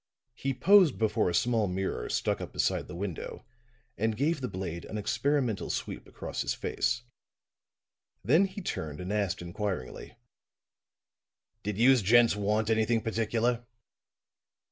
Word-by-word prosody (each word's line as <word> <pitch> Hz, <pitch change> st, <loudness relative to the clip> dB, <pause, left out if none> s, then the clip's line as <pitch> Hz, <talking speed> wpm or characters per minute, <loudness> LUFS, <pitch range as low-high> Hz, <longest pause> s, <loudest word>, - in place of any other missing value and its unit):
He 135 Hz, +2 st, -3 dB
posed 185 Hz, +2 st, +6 dB
before 110 Hz, -3 st, +1 dB
a 85 Hz, -, -1 dB
small 115 Hz, 0 st, +2 dB
mirror 95 Hz, +1 st, -3 dB
stuck -, -, 0 dB
up -, -, -6 dB
beside -, -, 0 dB
the 90 Hz, -, -8 dB
window 95 Hz, -2 st, -5 dB, 0.5 s
and 110 Hz, 0 st, 0 dB
gave 150 Hz, +2 st, +1 dB
the 125 Hz, -, -1 dB
blade 90 Hz, -4 st, -5 dB
an 110 Hz, -, -5 dB
experimental 125 Hz, +1 st, 0 dB
sweep -, -, -4 dB
across -, -, -5 dB
his -, -, -1 dB
face. 125 Hz, -, -1 dB, 1.2 s
Then 155 Hz, -, +5 dB
he 195 Hz, +1 st, -7 dB
turned 75 Hz, -, -4 dB
and 90 Hz, +3 st, -4 dB
asked 100 Hz, -4 st, -1 dB
inquiringly: 90 Hz, -, -5 dB, 1.4 s
"Did 105 Hz, -1 st, -3 dB
youse 125 Hz, +2 st, +5 dB
gents 115 Hz, +3 st, +5 dB
want 105 Hz, +2 st, 0 dB
anything 110 Hz, +1 st, +2 dB
particular?" 115 Hz, +2 st, 0 dB
110 Hz, 135 wpm, -29 LUFS, 100-125 Hz, 1.4 s, posed